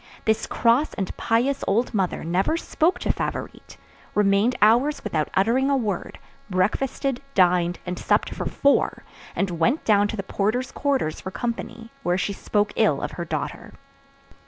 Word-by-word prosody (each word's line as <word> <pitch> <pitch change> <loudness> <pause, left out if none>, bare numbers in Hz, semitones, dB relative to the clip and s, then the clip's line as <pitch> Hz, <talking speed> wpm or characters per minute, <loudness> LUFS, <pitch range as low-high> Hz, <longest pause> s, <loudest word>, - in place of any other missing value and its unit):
This 220 -1 +1
cross 240 +6 +2
and 190 -2 -3
pious 245 +5 0
old 230 +5 +1
mother 190 -4 -1
never 185 - +1
spoke 335 +1 +1
to - - +1
Favourite, - - -5 0.4
remained 210 +4 +3
hours 245 +8 +3
without 160 -8 -1
uttering 240 +8 +2
a 280 - +3
word, 210 -7 -3 0.3
breakfasted, 240 +8 0
dined, 175 -2 +3
and 180 0 -4
supped - - +1
for - - -4
four, 280 0 +1 0.3
and 180 -4 -1
went 170 - +1
down 205 -1 +4
to 220 - -5
the 195 - -3
porter's 220 +7 -1
quarters 275 - -1
for - - -5
company, 230 +1 -5
where 175 -7 +1
she 200 +2 -1
spoke 205 +1 -1
ill - - +3
of - - -4
her - - -5
daughter. - - -5
215 Hz, 160 wpm, -24 LUFS, 190-255 Hz, 0.4 s, down